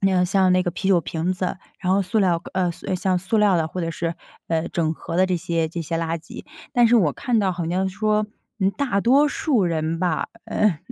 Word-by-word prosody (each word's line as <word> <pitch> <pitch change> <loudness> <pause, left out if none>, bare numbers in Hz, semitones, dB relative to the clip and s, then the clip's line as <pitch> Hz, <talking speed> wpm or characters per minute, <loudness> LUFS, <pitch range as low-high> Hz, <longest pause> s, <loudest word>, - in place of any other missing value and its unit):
那 195 -1 +2
个 180 0 +3
像 190 0 +3
那 185 - +4
个 175 - -1
啤 190 +3 -3
酒 185 -3 +5
瓶 165 +2 -2
子， 185 0 -3 0.2
然 185 -1 +1
后 200 - +2
塑 200 +4 -1
料 175 -4 +2
呃， 185 -2 +1
像 185 +2 -1
塑 190 +5 0
料 205 -3 +4
的， 160 -1 0
或 180 - -5
者 165 -1 -2
是， 165 0 -3 0.3
呃， 165 -1 0
整 160 -2 0
合 165 - -6
的 185 - +5
这 185 -1 0
些， 165 -1 -1
这 170 +1 -5
些 165 +1 -3
垃 165 0 -2
圾。 165 - -11 0.3
但 240 -3 +5
是 240 - +5
我 170 -10 +3
看 240 - 0
到 195 -3 +1
好 175 -2 -4
像 185 +2 0
说， 210 +2 0 0.3
嗯， 190 0 +3
大 250 -7 0
多 275 +7 +4
数 270 -8 +1
人 165 -1 -1
吧， 180 -1 0 0.2
嗯， 200 -7 +1
185 Hz, 255 characters per minute, -23 LUFS, 170-200 Hz, 0.3 s, 酒